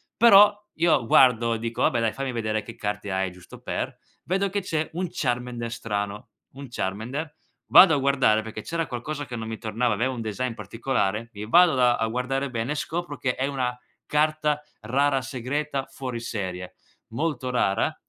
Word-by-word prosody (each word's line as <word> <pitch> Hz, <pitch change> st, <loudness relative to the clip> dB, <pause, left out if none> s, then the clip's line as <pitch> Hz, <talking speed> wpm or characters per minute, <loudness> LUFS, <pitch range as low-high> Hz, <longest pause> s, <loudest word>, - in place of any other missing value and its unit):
Però 205 Hz, -2 st, +8 dB, 0.2 s
io 160 Hz, -7 st, +3 dB
guardo 115 Hz, -1 st, +5 dB
e -, -, -4 dB
dico: 115 Hz, +1 st, -4 dB
"Vabbè 120 Hz, -, +3 dB
dai, 115 Hz, -2 st, 0 dB
fammi 135 Hz, +2 st, -3 dB
vedere 110 Hz, -2 st, -1 dB
che 115 Hz, +2 st, -10 dB
carte 105 Hz, -1 st, -4 dB
hai 95 Hz, 0 st, -1 dB
giusto 90 Hz, 0 st, -14 dB
per." -, -, -4 dB, 0.3 s
Vedo 195 Hz, +2 st, 0 dB
che 200 Hz, +2 st, -1 dB
c'è 160 Hz, -4 st, -2 dB
un 180 Hz, +2 st, -2 dB
Charmander 120 Hz, -2 st, -2 dB
strano, 105 Hz, 0 st, -4 dB, 0.2 s
un 140 Hz, 0 st, -9 dB
Charmander 125 Hz, +9 st, -4 dB, 0.4 s
vado 180 Hz, -4 st, +9 dB
a -, -, +1 dB
guardare 135 Hz, -6 st, +3 dB
perché 110 Hz, 0 st, -7 dB
c'era 165 Hz, +6 st, -2 dB
qualcosa 145 Hz, +4 st, -5 dB
che 125 Hz, -, -7 dB
non 110 Hz, -1 st, -5 dB
mi 110 Hz, 0 st, -5 dB
tornava, 115 Hz, +2 st, 0 dB
aveva 125 Hz, +5 st, 0 dB
un 120 Hz, -, -5 dB
design 115 Hz, +3 st, -3 dB
particolare, 115 Hz, 0 st, -2 dB
i 105 Hz, 0 st, -6 dB
vado 175 Hz, +5 st, +6 dB
da 125 Hz, -1 st, +4 dB
a 115 Hz, -, 0 dB
guardare 130 Hz, +4 st, -2 dB
bene 115 Hz, +2 st, -3 dB
e -, -, -6 dB
scopro 165 Hz, 0 st, -4 dB
che 125 Hz, -2 st, -1 dB
è 130 Hz, -, -1 dB
una 130 Hz, -3 st, -2 dB, 0.3 s
carta 150 Hz, 0 st, +1 dB, 0.2 s
rara 135 Hz, +4 st, +1 dB
segreta 135 Hz, +2 st, -3 dB
fuori 130 Hz, -3 st, -6 dB
serie, 95 Hz, -6 st, -5 dB, 0.4 s
molto 130 Hz, +1 st, -2 dB
rara, 100 Hz, -6 st, +1 dB
125 Hz, 180 wpm, -25 LUFS, 110-145 Hz, 0.4 s, vado